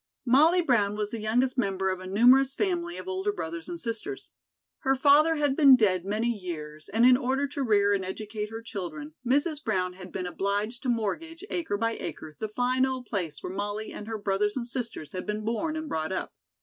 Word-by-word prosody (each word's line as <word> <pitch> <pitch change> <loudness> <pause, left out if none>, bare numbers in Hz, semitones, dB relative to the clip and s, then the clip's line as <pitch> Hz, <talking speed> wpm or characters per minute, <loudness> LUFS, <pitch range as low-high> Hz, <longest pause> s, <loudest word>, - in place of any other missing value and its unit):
Molly 315 +8 +5
Brown 210 -8 +2
was 210 0 -3
the 230 - -4
youngest 250 +4 +1
member 190 -3 0
of 185 - -3
a 185 - -8
numerous 250 +7 +5
family 345 -3 -1
of - - -8
older 380 +2 -1
brothers 170 - -5
and 345 - -4
sisters. 235 - -4 0.5
Her 270 0 +2
father 290 +4 +5
had 290 -3 +1
been 275 -3 +8
dead 190 -7 +2
many 220 +4 0
years, 155 -5 -6
and 230 +3 +3
in 250 0 +8
order 265 +2 0
to 285 0 -4
rear 205 -5 +3
and 195 -1 0
educate 210 +2 -5
her 225 +1 -7
children, 160 -9 -6
Mrs. 290 +5 +1
Brown 185 -5 0
had 185 0 -11
been 185 - -4
obliged 205 +6 -2
to 260 - -2
mortgage, 300 - -2
acre 325 - -1
by 230 +2 -1
acre, 155 -1 -7
the 220 - -3
fine 250 +4 +1
old 260 -1 -1
place 175 -9 -4
where 180 - -4
Molly 205 +2 -4
and 210 - -8
her 225 -1 -3
brothers 205 +2 0
and 240 - -2
sisters 235 - -5
had 185 +2 -6
been 210 0 -3
born 305 +8 -1
and 315 0 -4
brought 160 - -2
up. 190 - -3
225 Hz, 210 wpm, -28 LUFS, 195-270 Hz, 0.5 s, been